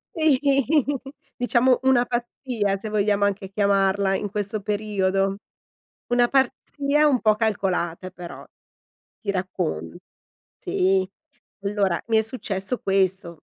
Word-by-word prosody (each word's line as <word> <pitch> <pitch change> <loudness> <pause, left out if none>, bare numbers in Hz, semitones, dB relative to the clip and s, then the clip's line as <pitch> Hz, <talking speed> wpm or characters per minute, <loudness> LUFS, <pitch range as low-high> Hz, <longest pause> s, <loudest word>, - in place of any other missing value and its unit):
Si, 310 -5 +3 1.0
diciamo 245 +1 +3
una 260 -2 +4
pazzia, 240 -4 -2
se 215 +2 -6
vogliamo 205 -1 +1
anche 195 -1 -2
chiamarla, 195 -1 +2
in 205 - -3
questo 205 +1 -3
periodo. 195 -2 0 0.7
Una 245 0 +3
pazzia 280 +2 +1
un 265 -4 +3
po' 215 -1 +4
calcolata, 185 -5 -1
però; 180 -2 -10 0.8
ti 205 - -6
raccon 180 - -3 0.6
sì, 190 0 +1 0.6
allora, 200 -3 0
mi 225 -1 +4
è - - +3
successo 215 -1 -2
questo: 190 -4 0
200 Hz, 110 wpm, -24 LUFS, 190-240 Hz, 1.0 s, una